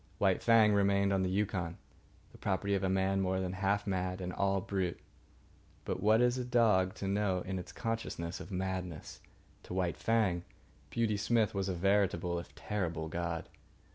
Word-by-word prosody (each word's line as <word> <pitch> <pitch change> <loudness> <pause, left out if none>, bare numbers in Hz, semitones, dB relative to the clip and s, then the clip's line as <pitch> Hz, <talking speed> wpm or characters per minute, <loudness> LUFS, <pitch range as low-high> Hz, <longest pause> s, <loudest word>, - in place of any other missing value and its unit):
White 95 -2 +2
Fang 110 -2 +5
remained 100 0 +3
on 95 - +2
the 95 - 0
Yukon, 95 -3 -1 0.5
the - - -16
property 100 +1 0
of 100 -1 0
a 95 - +1
man 95 +1 +1
more 95 0 0
than 90 -1 -2
half 100 +2 0
mad 95 -1 -1
and 90 -1 -4
all 100 0 +1
brute. 95 -2 -2 0.9
But - - -3
what 110 +3 +5
is 125 +1 +3
a - - -1
dog 110 -7 +3
to 100 - -4
know 100 -2 +1
in 95 +1 -3
its 90 - -8
consciousness 110 -7 -3
of - - -8
madness? 90 -3 -4 0.4
To - - -7
White 90 -2 0
Fang, 105 -6 +1 0.5
Beauty 110 0 0
Smith 110 0 +2
was 100 -1 -1
a 95 - -1
veritable, 90 -2 +1
if 85 - -11
terrible, 85 -6 -3
god. 85 0 -3
95 Hz, 175 wpm, -33 LUFS, 90-105 Hz, 0.9 s, Fang